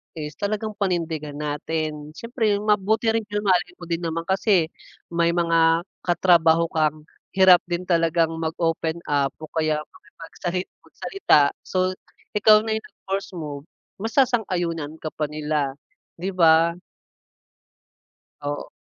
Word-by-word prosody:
is 150 -2 -5
talagang 215 +1 -2
panindigan 165 -6 -2
natin. 150 0 -4
Siyempre 230 -2 0
mabuti 215 +2 +2
rin 225 -2 -1
yung 205 0 -3
mahalin 180 -2 +1
mo 180 - -13
din 170 0 -2
naman 165 -1 -3
kasi 190 -3 +2 0.4
may 170 0 +1
mga 165 -1 +3 0.2
katrabaho 170 -2 +3
kang 155 -1 0 0.3
hirap 190 -2 +7
din 175 +1 -2
talagang 165 -2 +2
mag-open 165 0 -2
up 140 -1 +1
o 155 - -9
kaya 155 -1 +1
makipagsali 175 +2 -6 0.2
magsalita, 150 - +2
so 185 0 -1 0.4
ikaw 215 0 +5
na 220 - -3
yung 220 0 -2
mag - - -39
first 195 -1 -3
move, 150 -2 -6 0.3
masasang-ayunan 185 - 0
ka 155 - -3
pa 150 - -2
nila, 150 -2 -2 0.4
di 185 +3 -4
ba? 165 -2 +5 1.7
Oo. 145 0 -4
170 Hz, 125 wpm, -23 LUFS, 155-190 Hz, 1.7 s, hirap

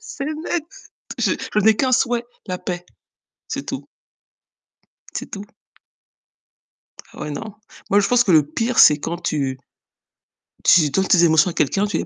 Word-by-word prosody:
c'est 445 -11 -7
net. 310 +1 -3 0.5
Je - - +1
je - - -3
n'ai 220 +1 +5
qu'un 260 -1 0
souhait, 240 0 +1 0.2
la 180 -1 -4
paix, 175 -1 -5 0.6
c'est - - -5
tout. - - -6 1.3
C'est - - -6
tout. 200 0 -7 1.7
Ouais 150 - -6
non. 200 +8 -7 0.4
Moi 205 - +4
je 200 - +1
pense 245 0 +4
que 190 - +1
le 155 -3 +6
pire 225 +11 -1
c'est 150 -1 +7
quand 170 +3 -4
tu 135 -5 -2 1.1
tu 160 -5 +5
donnes 190 +7 0
tes 175 -2 +4
émotions 160 +1 +4
à - - -6
quelqu'un, 195 +8 +1
tu 205 - -2
les - - -3
195 Hz, 160 wpm, -20 LUFS, 160-240 Hz, 1.7 s, c'est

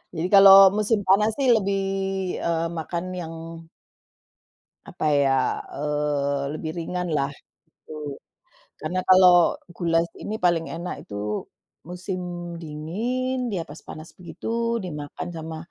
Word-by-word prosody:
Jadi 165 +2 -1
kalau 195 0 +10 0.2
musim 215 +1 +2
panas 210 +3 +4
sih 275 - +2
lebih, 200 -2 0 0.7
eee, 165 0 0
makan 170 +2 -4 0.2
yang 165 -2 -6 1.6
apa - - -6
ya, 135 -2 +2 0.2
eee, 145 -1 -1
lebih 155 0 -5
ringan 180 +1 -3
lah 140 -2 +1 0.4
gitu. 150 -2 -9 0.6
Karena 175 +4 -3
kalau 180 -2 +6 0.2
goulash 170 -1 0
ini 215 - -4
paling 175 -5 +1
enak 170 +2 -6
itu 100 - -8 0.7
musim 180 +1 -5 0.4
dingin, 235 +12 -3
dia 180 -4 -2
pas 155 -1 -12
panas 155 +1 -11
begitu 230 +6 -3
dimakan 150 -1 -6
sama 160 -1 -6
170 Hz, 120 wpm, -24 LUFS, 155-190 Hz, 1.6 s, kalau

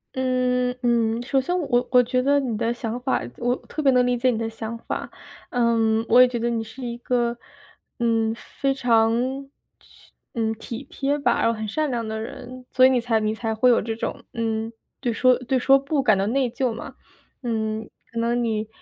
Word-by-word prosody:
嗯， 250 -1 +1
嗯。 235 -1 +2
首 270 +1 +1
先 355 +7 -1
我 250 -5 +1
我 250 -1 +7
觉 250 +1 0
得 285 +2 +3
你 250 -5 -2
的 230 +2 0
想 235 0 -4
法 260 +1 0 0.2
我 245 +1 0
特 305 - -6
别 275 - +4
能 250 -1 +4
理 245 0 +2
解 255 +2 +2
你 230 - 0
的 225 - -2
想 225 +1 -6
法， - - -5 0.4
嗯， 230 -2 +2
我 245 +2 +7
也 255 - +8
觉 245 -1 -3
得 235 +1 -1
你 230 -1 -1
是 225 +4 -9
一 235 0 -4
个， 240 -1 0 0.6
嗯， 225 -1 +1
非 275 -1 -2
常 245 +2 +1 0.3
去 - - -22 0.2
嗯， 225 -1 0
体 230 +3 -7
贴 280 +1 -1
吧， 285 - +1
然 - - +3
后 230 - +2
很 215 -1 -5
善 305 +8 -1
良 235 -3 -2
的 220 0 -3
人， 250 +3 -8
所 255 - +6
以 - - +7
你 255 -2 +2
才 230 -1 +1
你 215 0 0
才 220 -1 -3
会 250 +3 +4
有 - - +3
这 225 +1 -3
种， 230 +1 -5
嗯， 225 -1 -2 0.3
对 245 -3 -1
说 255 +2 +4
对 255 +1 0
说 270 +2 +5
不 275 +1 -1
感 215 -5 +5
到 195 +1 0
内 265 +2 +1
疚 250 0 -1
嘛， 265 +4 -7 0.5
嗯， 220 -2 -2 0.2
可 230 - -4
能 235 +1 +1
你， 220 -1 -1
240 Hz, 225 characters per minute, -23 LUFS, 225-255 Hz, 0.6 s, 也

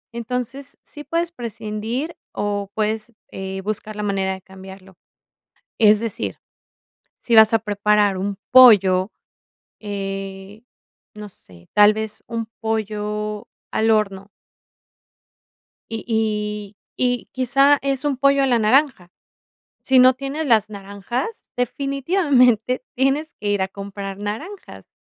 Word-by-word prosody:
entonces, 250 +4 -5
sí 295 - -9
puedes 335 +3 -2
prescindir 230 - -5 0.2
o 205 -1 -2
puedes, 220 +2 -2 0.2
eh, 190 0 -5
buscar 215 +1 -4
la 210 - -4
manera 195 -1 -1
de 190 - -9
cambiarlo. 190 0 -13 0.8
Es 215 -2 +6
decir, 225 -2 -4 0.8
si 235 - -3
vas 220 -1 +8
a - - +6
preparar 205 -1 +1
un 200 0 -3
pollo, 205 -6 +7 0.7
eh, 195 0 -6 0.5
no 210 0 -9
sé, 90 - -18
tal 210 0 +6
vez 220 0 -5
un 230 -1 -4
pollo 210 -1 -3 0.2
al 225 +1 +1
horno. 200 -2 0 1.6
Y 225 -1 -4
y 210 -2 -2 0.2
y 245 -1 0
quizá 275 +3 +3
es 275 0 -2
un 285 -2 +1
pollo 275 +1 +3
a - - +3
la 245 -3 +2
naranja. 220 -5 +2 0.7
Si 265 - +2
no 255 +1 +7
tienes 275 +4 -4
las 220 -5 +3
naranjas, 200 - -4 0.3
definitivamente 255 - +1
tienes 275 +4 0
que 205 - -2
ir 205 -2 +1
a - - -2
comprar 195 0 -7
naranjas, 290 - -7
215 Hz, 120 wpm, -21 LUFS, 200-255 Hz, 1.6 s, vas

